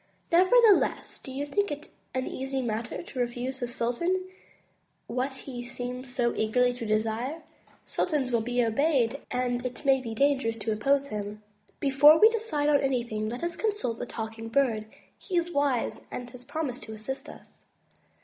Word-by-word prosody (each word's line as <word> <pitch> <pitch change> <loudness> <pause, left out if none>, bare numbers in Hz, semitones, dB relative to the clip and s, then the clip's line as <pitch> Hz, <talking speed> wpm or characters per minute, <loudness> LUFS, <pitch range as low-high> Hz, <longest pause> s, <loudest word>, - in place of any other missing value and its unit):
Nevertheless, 400 +5 +4
do 265 - -9
you 275 +2 -3
think 405 +7 0
it 295 +1 -6 0.2
an 260 0 0
easy 265 0 -3
matter 230 +4 -3
to 270 - -8
refuse 245 +2 -2
the 245 - -2
sultan 295 +11 0 0.8
what 255 +3 -2
he 255 -2 -7
seems 245 +1 -6
so 245 -2 +1
eagerly 245 +3 +2
to 235 -2 -6
desire? 225 +8 -1 0.4
Sultans 290 -7 0
will 235 -1 +2
be 245 +1 +1
obeyed 270 +1 +1
and 245 -1 -1
it 255 +3 -5
may 270 -1 +4
be 230 -3 -5
dangerous 270 -3 +2
to 220 0 -2
oppose 275 +6 +2
him. 210 0 -5 0.4
Before 290 +2 +7
we 435 - +9
decide 425 -11 0
on 295 -1 +5
anything, 235 -5 -1
let 245 +7 -5
us 340 0 -1
consult 415 - -1
the - - -4
Talking 225 0 -6
Bird. 230 -4 +1 0.3
He 370 -3 -2
is 345 0 0
wise 285 -5 0
and 245 - -6
has 250 -1 -10
promised 285 -3 -3
to 220 - -8
assist 220 +5 -5
us.' - - -14
255 Hz, 170 wpm, -28 LUFS, 235-290 Hz, 0.8 s, we